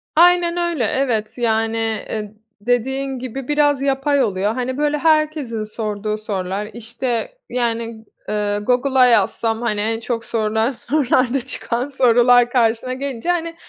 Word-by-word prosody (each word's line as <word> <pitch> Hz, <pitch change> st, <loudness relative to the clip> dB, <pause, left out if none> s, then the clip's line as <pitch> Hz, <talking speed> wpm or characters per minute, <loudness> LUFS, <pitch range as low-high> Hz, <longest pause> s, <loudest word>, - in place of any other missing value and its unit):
Aynen 345 Hz, 0 st, +4 dB
öyle, 345 Hz, -6 st, 0 dB
evet. 235 Hz, -3 st, -1 dB
Yani, 225 Hz, -1 st, 0 dB
eee, 220 Hz, -1 st, -3 dB, 0.3 s
dediğin 260 Hz, +3 st, -1 dB
gibi, 255 Hz, +1 st, -6 dB
biraz 290 Hz, -2 st, +2 dB
yapay 275 Hz, 0 st, +1 dB
oluyor. 205 Hz, 0 st, 0 dB
Hani, 255 Hz, +1 st, -3 dB
böyle, 295 Hz, 0 st, +1 dB
herkesin 305 Hz, -7 st, +1 dB
sorduğu 215 Hz, -1 st, -3 dB
sorular, 200 Hz, -1 st, -4 dB
işte, 240 Hz, -, -4 dB
yani, 230 Hz, -2 st, -2 dB, 0.2 s
eee, 205 Hz, -1 st, -1 dB
Google'a 255 Hz, +2 st, +3 dB
yazsam, 225 Hz, 0 st, +2 dB
hani, 210 Hz, -3 st, -1 dB
en 225 Hz, +1 st, -1 dB
çok 230 Hz, 0 st, -3 dB
sorulan 220 Hz, 0 st, 0 dB
sorularda 260 Hz, -1 st, +1 dB
çıkan 250 Hz, 0 st, -3 dB
sorular 245 Hz, -2 st, +4 dB
karşına 240 Hz, +1 st, +1 dB
gelince, 270 Hz, +2 st, -4 dB
hani, 335 Hz, -1 st, -1 dB
245 Hz, 130 wpm, -20 LUFS, 220-275 Hz, 0.3 s, Aynen